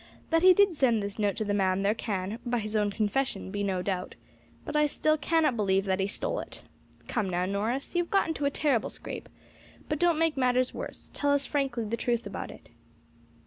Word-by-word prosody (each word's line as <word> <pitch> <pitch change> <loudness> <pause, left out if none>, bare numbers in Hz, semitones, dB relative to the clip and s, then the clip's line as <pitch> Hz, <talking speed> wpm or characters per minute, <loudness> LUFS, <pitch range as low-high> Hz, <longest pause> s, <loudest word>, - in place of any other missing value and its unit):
That 330 0 +4
he 370 0 +8
did 405 -1 +5
send 240 -8 +2
this 200 +1 -5
note 205 -2 +1
to 215 - -2
the 205 - 0
man 190 -1 +1
there 205 +1 +3
can, 205 -1 -3
by 245 0 0
his 215 -1 -3
own 210 -1 +2
confession, 210 0 -1
be 205 0 -3
no 190 -2 -1
doubt, 185 -2 -3 0.5
but - - -5
I 300 0 +4
still 310 +1 +2
cannot 310 -3 +2
believe 195 -2 +1
that 190 -1 0
he 190 - +1
stole 205 - -2
it. - - -8 0.4
Come 210 -5 -1
now, 180 0 0
Norris, 215 +8 -2
you 350 - +2
have 340 - -13
got 390 -4 +3
into 315 -3 -2
a - - +4
terrible 280 -5 +1
scrape, - - -7 0.6
but 300 -2 -2
don't 345 -2 +3
make 325 -1 +2
matters 255 -1 +2
worse; - - -7
tell 285 0 +1
us 285 -1 +2
frankly 270 -5 -1
the 225 +2 -2
truth 235 0 -1
about - - -5
it." - - -13
235 Hz, 220 wpm, -28 LUFS, 200-290 Hz, 0.6 s, he